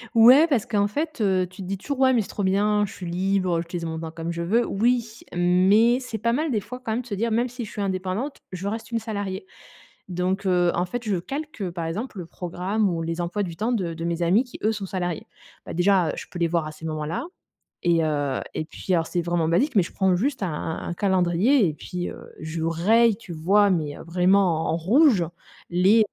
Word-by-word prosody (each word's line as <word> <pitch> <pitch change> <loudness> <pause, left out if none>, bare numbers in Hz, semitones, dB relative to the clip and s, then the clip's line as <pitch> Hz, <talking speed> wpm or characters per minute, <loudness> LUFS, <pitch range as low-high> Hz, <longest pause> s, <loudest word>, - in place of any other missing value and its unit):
Ouais, 255 +8 +8
parce 260 -9 +1
qu'en 205 -2 +1
fait, 305 +5 -3
heu, 185 -3 +2
tu 185 +1 -11
te 185 - -6
dis 195 +1 -2
toujours: 275 +7 -4
«Ouais 260 -1 +5
mais 230 - +3
c'est - - -6
trop 205 - -3
bien, 205 +2 +2
je 195 - -9
suis 180 - -8
libre, 185 0 0
j'utilise 170 0 -5
mon 160 0 -4
temps 160 -1 -6
comme 165 +1 -4
je 170 0 -4
veux». 225 +8 +2
Oui 230 +1 0 0.2
mais 190 +7 +4
c'est 250 -4 -5
pas 235 +2 0
mal 305 +4 0
des 220 - +1
fois 250 +5 -8
quand 220 - -3
même 240 - -1
de - - -15
se 210 - -5
dire: 230 +3 -1
«Même 240 +3 +1
si 245 -1 -6
je - - -11
suis 205 - -5
indépendante, 195 +8 -2
je 185 +1 -4
reste 225 +2 -4
une 230 - 0
salariée». 200 -4 -4 0.6
Donc 185 +2 -1
heu, 180 -2 +3
en 175 - +1
fait, 240 +6 -5
je 195 - +1
calque, 270 - -5
par 170 -1 -4
exemple, 205 +6 -4
le 175 - -5
programme 180 +5 -2
ou 170 -2 -2
les 165 +1 -3
emplois 185 +4 -1
du 170 -3 -5
temps 220 +7 -1
de 185 -8 -1
de 165 +1 -5
mes 170 0 -2
amis 185 +9 +4
qui 245 - -12
eux, 215 - +3
sont 205 -3 -4
salariés. 180 -3 -3 0.4
Bah - - -6
déjà, 180 -1 +3
heu, - - 0
je - - -7
peux 175 - -6
les 170 - +2
voir 165 -2 0
à - - -6
ces 155 +1 -11
moments-là 155 - -3 0.6
et 170 -2 +3
heu 145 -3 -1
et - - -2
puis 185 - -5
alors 165 -1 +1
c'est 175 - -1
vraiment 170 -1 0
basique 250 - +1
mais 195 - +6
je 170 - -7
prends 190 -2 +2
juste 265 +4 -1
un 185 - 0
un 160 +1 -4
un 175 - -3
calendrier 190 +6 +3
et 155 - -3
puis, 175 +3 -5
heu, - - -9 0.2
je 160 +1 -4
raye, 205 +7 +3
tu 205 -6 -10
vois? 195 +6 +3
Mais, 155 -5 -1
heu, - - -9
vraiment 180 -1 +3
en 165 - +1
rouge, 215 - +4 0.5
les 185 +6 +4
190 Hz, 245 wpm, -24 LUFS, 170-220 Hz, 0.6 s, Ouais